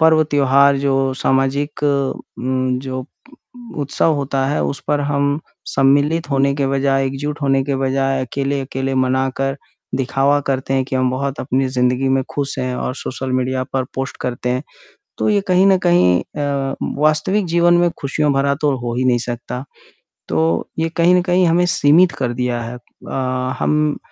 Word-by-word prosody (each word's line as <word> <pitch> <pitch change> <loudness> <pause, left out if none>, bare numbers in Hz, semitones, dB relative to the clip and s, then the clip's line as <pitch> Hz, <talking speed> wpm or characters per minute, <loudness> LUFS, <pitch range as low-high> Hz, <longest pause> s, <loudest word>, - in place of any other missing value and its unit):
पर्व 160 0 +5
त्योहार 140 0 +4
जो 135 -1 +1
सामाजिक 135 +3 0 0.6
उम, 130 0 -1
जो 130 -1 -5
उ 130 - -8 0.8
उत्सव 145 +3 +1
होता 135 -1 -1
है 145 - 0
उस 140 - -3
पर 145 -1 +2
हम 145 +1 0 0.3
सम्मिलित 145 +4 +2
होने 140 0 +2
के 140 -1 0
बजाय, 135 0 +1
एकजुट 145 +3 -4
होने 135 -1 +2
के 140 -1 -1
बजाय 135 0 0
अकेले-अकेले 135 0 -2
मनाकर 130 +1 0 0.4
दिखावा 135 +2 +1
करते 135 0 -1
हैं 130 -1 +1
कि 130 - -3
हम 130 -1 +1
बहुत 135 +2 -3
अपनी 130 +1 0
ज़िंदगी 125 +1 +1
में 135 0 +2
ख़ुश 140 -1 -1
हैं 130 -1 -2
और 125 - -3
सोशल 130 -1 -4
मीडिया 130 0 0
पर 130 -1 0
पोस्ट 135 0 -4
करते 125 0 -3
हैं। 125 +2 -1 0.6
तो - - 0
ये 205 -1 +3
कहीं 185 +1 +4
न 190 -1 +5
कहीं 90 - +4 0.2
अ, 140 -1 -1 0.2
वास्तविक 155 +7 +2
जीवन 170 +1 +3
में 175 0 +3
ख़ुशियों 145 +1 0
भरा 140 +1 +1
तो 145 -3 +2
हो 120 -1 -4
ही 130 - 0
नहीं 125 -1 +3
सकता, 120 +1 -5 0.6
तो 80 +1 0
ये 165 - 0
कहीं 175 +2 +5
न 180 - +4
कहीं 180 0 +2
हमें 175 +2 +3
सीमित 170 +2 +4
कर 125 -3 -1
दिया 120 -1 -2
है 115 +1 -6
अ, 130 +1 -4
हम 150 -1 +1
135 Hz, 170 wpm, -18 LUFS, 130-145 Hz, 0.8 s, पर्व